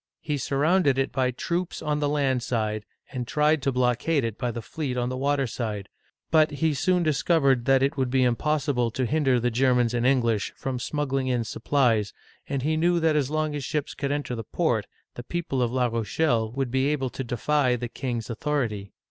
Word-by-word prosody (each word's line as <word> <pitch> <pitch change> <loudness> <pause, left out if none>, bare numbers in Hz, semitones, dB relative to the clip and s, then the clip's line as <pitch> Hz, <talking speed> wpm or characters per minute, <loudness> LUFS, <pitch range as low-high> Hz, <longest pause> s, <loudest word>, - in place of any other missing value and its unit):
He 150 -2 -3
surrounded 145 +1 +2
it 135 0 0
by 130 -2 +1
troops 170 +8 -3
on 150 0 -1
the 145 -1 0
land 135 -4 +1
side, 110 -3 -2 0.3
and 125 -3 -4
tried 150 +1 +2
to 135 - +1
blockade 125 +4 +1
it 115 -2 -2
by 125 0 -2
the 115 - -4
fleet 135 -3 -4
on 120 0 0
the 130 - -3
water 140 +1 +1
side; 110 -4 -4 0.4
but 155 -1 +5
he 150 +2 0
soon 180 +6 +1
discovered 140 -5 +2
that 135 0 +4
it 140 +3 0
would 130 -2 0
be 130 0 +2
impossible 135 0 +1
to 130 +3 -2
hinder 135 -1 +2
the 120 +1 0
Germans 125 -1 +2
and 120 -1 0
English 115 -6 +1
from 130 -2 -3
smuggling 135 0 -1
in 125 -2 +1
supplies, 115 -2 +1 0.4
and 135 -2 -2
he 155 +2 +1
knew 170 +2 +2
that 160 -2 +2
as 140 -3 +1
long 155 0 -1
as 145 -2 -4
ships 145 +2 -2
could 140 0 -3
enter 145 -3 -2
the 115 -2 -4
port - - 0 0.3
the - - -7
people 145 -3 -2
of 120 -1 +1
La 125 0 +1
Rochelle 115 0 0
would 130 -1 -2
be 130 +1 +2
able 135 -4 -1
to 135 - -4
defy 125 +2 +1
the 120 0 -4
king's 120 -2 -4
authority. 115 -5 -2
130 Hz, 205 wpm, -26 LUFS, 120-150 Hz, 0.4 s, but